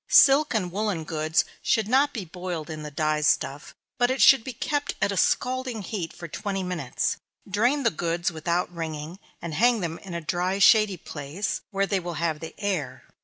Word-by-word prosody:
Silk 280 Hz, -1 st, +6 dB
and 185 Hz, -5 st, 0 dB
woollen 200 Hz, -4 st, -1 dB
goods 155 Hz, +1 st, 0 dB, 0.2 s
should 220 Hz, -2 st, +1 dB
not 275 Hz, +5 st, +3 dB
be 215 Hz, -8 st, -5 dB
boiled 175 Hz, -2 st, -5 dB
in 155 Hz, -1 st, -6 dB
the 150 Hz, -, -6 dB
dye 155 Hz, +1 st, 0 dB
stuff, 145 Hz, -1 st, 0 dB, 0.2 s
but 245 Hz, 0 st, +4 dB
it 260 Hz, +1 st, -1 dB
should 270 Hz, -4 st, +7 dB
be 260 Hz, -, -5 dB
kept 290 Hz, +4 st, -2 dB
at 205 Hz, -1 st, +1 dB
a -, -, -2 dB
scalding 250 Hz, +1 st, 0 dB
heat 180 Hz, -4 st, -4 dB
for 170 Hz, -, -9 dB
twenty 195 Hz, +3 st, -3 dB
minutes. 170 Hz, -9 st, -2 dB, 0.3 s
Drain 240 Hz, +9 st, +1 dB
the 230 Hz, -, +3 dB
goods 170 Hz, +1 st, -1 dB
without 170 Hz, +2 st, -1 dB
wringing, 160 Hz, +1 st, -5 dB, 0.2 s
and 170 Hz, -2 st, -4 dB
hang 235 Hz, +4 st, +3 dB
them 165 Hz, -1 st, -3 dB
in 185 Hz, -3 st, -8 dB
a -, -, -1 dB
dry, 175 Hz, +5 st, -1 dB
shady 205 Hz, -1 st, +5 dB
place, 155 Hz, +6 st, -4 dB
where 195 Hz, -2 st, 0 dB
they 195 Hz, -1 st, 0 dB
will 175 Hz, -1 st, -5 dB
have 160 Hz, 0 st, -1 dB
the 160 Hz, 0 st, -8 dB
air. 155 Hz, -11 st, -2 dB
180 Hz, 195 wpm, -26 LUFS, 160-215 Hz, 0.3 s, should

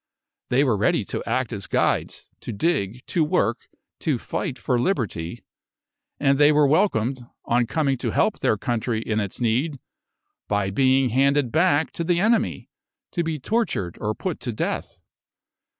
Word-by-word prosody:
"They 130 Hz, +3 st, +3 dB
were 125 Hz, -6 st, +2 dB
ready 105 Hz, -, +1 dB
to -, -, -4 dB
act -, -, -1 dB
as -, -, -4 dB
guides, -, -, 0 dB
to -, -, -6 dB
dig, 120 Hz, -, -1 dB
to 170 Hz, -, +1 dB
work, 150 Hz, -, 0 dB, 0.3 s
to -, -, 0 dB
fight 130 Hz, -, -4 dB
for 125 Hz, +1 st, 0 dB
liberty," 115 Hz, -, -2 dB, 0.8 s
and 140 Hz, -1 st, +3 dB
they 145 Hz, 0 st, +7 dB
were 150 Hz, -1 st, +4 dB
welcomed, 135 Hz, -, +1 dB, 0.2 s
on 120 Hz, 0 st, +2 dB
coming 140 Hz, -4 st, 0 dB
to -, -, -1 dB
help -, -, +1 dB
their -, -, +2 dB
country 120 Hz, -1 st, -1 dB
in 110 Hz, -1 st, -1 dB
its 100 Hz, -3 st, -4 dB
need, 130 Hz, +5 st, 0 dB, 0.7 s
by 100 Hz, -2 st, 0 dB
being 130 Hz, +3 st, +3 dB
handed 135 Hz, +1 st, +2 dB
back 160 Hz, -1 st, +2 dB
to 170 Hz, -, -4 dB
the 170 Hz, 0 st, +1 dB
enemy 225 Hz, +3 st, +1 dB, 0.4 s
to 170 Hz, -, -1 dB
be 160 Hz, -1 st, -2 dB
tortured 145 Hz, -, -1 dB
or 105 Hz, +1 st, -1 dB
put 185 Hz, -4 st, -4 dB
to 120 Hz, -, -4 dB
death. 105 Hz, -, -3 dB
130 Hz, 160 wpm, -24 LUFS, 115-155 Hz, 0.8 s, they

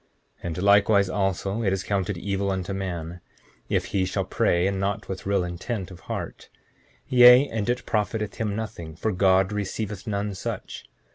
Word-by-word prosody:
7:9 -, -, -40 dB, 0.4 s
And 85 Hz, -2 st, -3 dB
likewise 100 Hz, -1 st, +5 dB
also 95 Hz, +2 st, -1 dB
is 95 Hz, -3 st, 0 dB
it -, -, -14 dB
counted 100 Hz, -2 st, -1 dB
evil 100 Hz, +2 st, -2 dB
unto 95 Hz, 0 st, -2 dB
a -, -, -2 dB
man, 90 Hz, -3 st, -5 dB, 0.5 s
if -, -, +1 dB
he 95 Hz, -, +2 dB
shall 95 Hz, -, -1 dB
pray 85 Hz, +1 st, +1 dB
and 95 Hz, 0 st, 0 dB
not 100 Hz, +1 st, -2 dB
with 95 Hz, 0 st, -6 dB
real 100 Hz, -2 st, +2 dB
intent 95 Hz, +3 st, -4 dB
of 90 Hz, -, -11 dB
heart; -, -, -6 dB, 0.6 s
yea, 125 Hz, +2 st, +8 dB
and 110 Hz, 0 st, -2 dB
it 125 Hz, 0 st, -1 dB
profiteth 105 Hz, 0 st, -1 dB
him 105 Hz, -3 st, -2 dB
nothing, 100 Hz, -8 st, -6 dB
for 110 Hz, +6 st, -1 dB
God 95 Hz, +1 st, +3 dB
receiveth 105 Hz, 0 st, -4 dB
none 100 Hz, -1 st, -2 dB
such. 95 Hz, -, -6 dB
100 Hz, 180 wpm, -25 LUFS, 95-105 Hz, 0.6 s, yea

